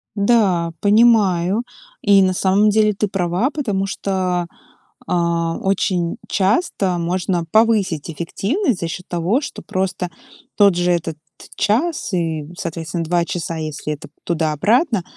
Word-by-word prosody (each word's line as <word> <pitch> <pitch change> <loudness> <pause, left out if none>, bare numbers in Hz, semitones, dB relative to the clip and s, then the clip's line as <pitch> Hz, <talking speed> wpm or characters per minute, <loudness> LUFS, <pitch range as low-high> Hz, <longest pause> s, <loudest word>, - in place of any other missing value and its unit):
Да, 200 -6 +2
понимаю. 205 -3 +4 0.4
И 200 -1 +5
на 185 0 +3
самом 195 +3 +3
деле 215 0 +3
ты 210 +1 -1
права, 185 +5 0
потому 210 -11 -2
что, 185 -3 -1 0.6
а, 170 -1 0
очень 185 -3 0
часто 195 - +1
можно 175 0 -1
повысить 210 -9 +2
эффективность 200 - -1
за 170 - -2
счет 180 +2 -7
того, 180 - 0
что 290 - -7
просто 185 -1 -2 0.5
тот 200 -3 +5
же 175 0 +1
этот 165 -2 -1 0.4
час 245 - 0
и, 165 -4 -1
соответственно, 165 -1 -4
2 170 +1 +1
часа, 170 -1 -4
если 155 -1 -4
это 145 - -10 0.2
туда-обратно, 180 - +1
185 Hz, 125 wpm, -19 LUFS, 170-210 Hz, 0.6 s, И